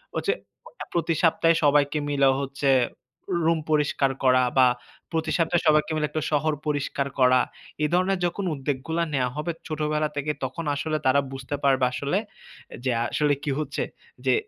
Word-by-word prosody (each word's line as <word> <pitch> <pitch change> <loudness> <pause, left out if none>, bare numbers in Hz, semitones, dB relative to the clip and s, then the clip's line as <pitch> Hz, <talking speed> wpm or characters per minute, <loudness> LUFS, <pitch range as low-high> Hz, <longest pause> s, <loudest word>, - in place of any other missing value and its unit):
হচ্ছে 400 - +1 0.6
প্রতি 165 -1 +1
সপ্তাহে 165 0 +4
সবাইকে 145 0 +3
মিলে 140 -1 +4
হচ্ছে 140 0 -1 0.8
রুম 165 -1 +3
পরিষ্কার 145 -2 +2
করা 130 -1 +5
বা 130 -1 +7 0.4
প্রতি 160 -1 -1
সপ্তাহে 170 0 +2
সবাইকে 155 +1 +4
মিলে 150 -1 0
১ - - -26
টা 155 - 0
শহর 155 +1 +2
পরিষ্কার 140 -1 -1
করা। 125 -1 +5 0.4
এই 150 - +2
ধরনের 185 +1 +2
যখন 175 +3 -2
উদ্যোগগুলা 145 +4 -2
নেয়া 125 -2 +1
হবে, 155 +3 -2 0.2
ছোটবেলা 150 -1 -1
থেকে 145 +1 -1
তখন 130 +6 -4
আসলে 155 +2 -1
তারা 130 +2 +5
বুঝতে 135 +1 -5
পারবে 135 -2 +4
আসলে 140 +8 -1 0.7
যে, 130 - +1 0.2
আসলে 150 +2 +1
কি 145 - -1
হচ্ছে, 155 - -2 0.4
যে - - +4
150 Hz, 160 wpm, -25 LUFS, 135-160 Hz, 0.8 s, বা